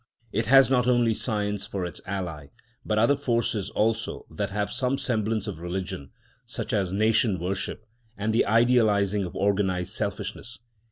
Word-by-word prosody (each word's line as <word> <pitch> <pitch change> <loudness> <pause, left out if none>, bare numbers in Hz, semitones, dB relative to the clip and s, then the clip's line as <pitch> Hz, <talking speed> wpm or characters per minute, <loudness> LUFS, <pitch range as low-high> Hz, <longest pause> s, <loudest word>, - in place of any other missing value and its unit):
It 115 +2 -1
has 135 +1 +7
not 125 -2 +3
only 120 -2 +3
science 105 -3 -2
for 100 -5 -3
its 85 - -7
ally, 90 -7 -4 0.4
but 105 - -1
other 115 +6 +4
forces 120 -7 -1
also 115 +2 -1
that 100 -1 -2
have 105 0 -2
some 130 +1 0
semblance 110 -5 -1
of 100 -7 -5
religion, 85 -5 -5 0.4
such - - -5
as 95 -3 +1
nation 110 0 +2
worship 95 +5 -3 0.3
and 105 +2 -1
the 115 - +3
idealising 105 -3 +3
of 90 - -8
organised 95 -1 0
selfishness. 105 +2 -4
105 Hz, 155 wpm, -26 LUFS, 95-115 Hz, 0.4 s, has